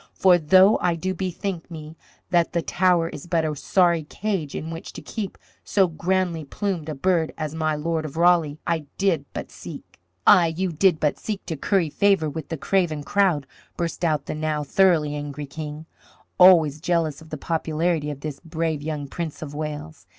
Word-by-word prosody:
For 180 Hz, -2 st, +5 dB
though 185 Hz, +6 st, +5 dB
I 175 Hz, -1 st, +1 dB
do 185 Hz, +3 st, -2 dB
bethink 185 Hz, -1 st, -4 dB
me 155 Hz, -1 st, -9 dB, 0.4 s
that 170 Hz, -2 st, +2 dB
the 170 Hz, -1 st, 0 dB
Tower 175 Hz, -2 st, +2 dB
is 150 Hz, +1 st, -9 dB
but 165 Hz, -2 st, +1 dB
a 155 Hz, -1 st, -2 dB
sorry 170 Hz, +1 st, +2 dB
cage 185 Hz, -4 st, -3 dB
in 160 Hz, -, -5 dB
which 165 Hz, 0 st, -8 dB
to -, -, -8 dB
keep 210 Hz, -5 st, -5 dB, 0.3 s
so 195 Hz, -2 st, +3 dB
grandly 175 Hz, 0 st, -1 dB
plumed 170 Hz, +1 st, -3 dB
a 155 Hz, -, -3 dB
bird 165 Hz, +2 st, +1 dB
as 155 Hz, -2 st, -4 dB
my 155 Hz, -1 st, 0 dB
Lord 160 Hz, +1 st, -1 dB
of 155 Hz, 0 st, -7 dB
Raleigh, 170 Hz, -4 st, +3 dB
I 160 Hz, -3 st, -1 dB
did 180 Hz, -8 st, +1 dB
but -, -, -6 dB
seek -, -, -11 dB
" 90 Hz, -, -47 dB
"Ay, 170 Hz, -5 st, +6 dB
you 185 Hz, -1 st, 0 dB
did 165 Hz, 0 st, +3 dB
but 150 Hz, -, 0 dB
seek 210 Hz, -3 st, -5 dB
to 160 Hz, -, -3 dB
curry 170 Hz, +1 st, 0 dB
favour 195 Hz, -6 st, +2 dB
with 155 Hz, 0 st, -6 dB
the 165 Hz, -, -3 dB
craven 160 Hz, -3 st, 0 dB
crowd," 180 Hz, -6 st, +2 dB, 0.3 s
burst 170 Hz, 0 st, -3 dB
out 155 Hz, -4 st, +1 dB
the -, -, -4 dB
now 155 Hz, -1 st, -2 dB
thoroughly 155 Hz, -2 st, +3 dB
angry 145 Hz, 0 st, -5 dB
King, 150 Hz, +2 st, -7 dB, 0.5 s
always 165 Hz, -5 st, +6 dB
jealous 165 Hz, -4 st, 0 dB
of 160 Hz, -, -14 dB
the 155 Hz, -, -5 dB
popularity 160 Hz, 0 st, -1 dB
of 145 Hz, -2 st, -6 dB
this 150 Hz, -2 st, -5 dB
brave 160 Hz, -2 st, -2 dB
young 150 Hz, -2 st, -4 dB
Prince 160 Hz, +1 st, -5 dB
of 145 Hz, -2 st, -7 dB
Wales. 150 Hz, +1 st, -6 dB
160 Hz, 190 wpm, -24 LUFS, 150-180 Hz, 0.5 s, Ay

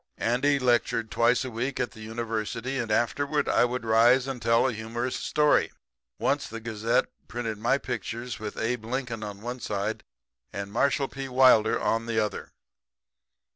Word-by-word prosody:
Andy 130 Hz, +5 st, +2 dB
lectured 120 Hz, -3 st, +1 dB
twice 120 Hz, +2 st, +3 dB
a 130 Hz, -, -5 dB
week 125 Hz, +4 st, -3 dB
at 125 Hz, -, -1 dB
the 110 Hz, -, -14 dB
University; 115 Hz, +3 st, -3 dB
and 115 Hz, -2 st, -3 dB
afterward 145 Hz, +7 st, +1 dB
I -, -, +4 dB
would 125 Hz, -1 st, -3 dB
rise 120 Hz, +3 st, +5 dB
and 135 Hz, -3 st, -5 dB
tell 115 Hz, +2 st, +3 dB
a 130 Hz, -, -1 dB
humorous 115 Hz, +3 st, -3 dB
story. 150 Hz, -1 st, +2 dB, 0.5 s
Once -, -, 0 dB
the 115 Hz, -, -7 dB
Gazette 115 Hz, 0 st, 0 dB, 0.2 s
printed 115 Hz, -3 st, -4 dB
my 120 Hz, +5 st, +2 dB
pictures 120 Hz, -1 st, -5 dB
with 105 Hz, -1 st, -6 dB
Abe 115 Hz, 0 st, -2 dB
Lincoln 120 Hz, -2 st, -3 dB
on 105 Hz, -1 st, -7 dB
one 120 Hz, +3 st, -5 dB
side 105 Hz, 0 st, -3 dB, 0.5 s
and 100 Hz, +1 st, -5 dB
Marshall 140 Hz, +4 st, +1 dB
P. 135 Hz, 0 st, -6 dB
Wilder 125 Hz, -4 st, +5 dB
on 115 Hz, +1 st, 0 dB
the 115 Hz, -1 st, -2 dB
other. 105 Hz, -2 st, -2 dB
120 Hz, 165 wpm, -27 LUFS, 110-125 Hz, 0.5 s, rise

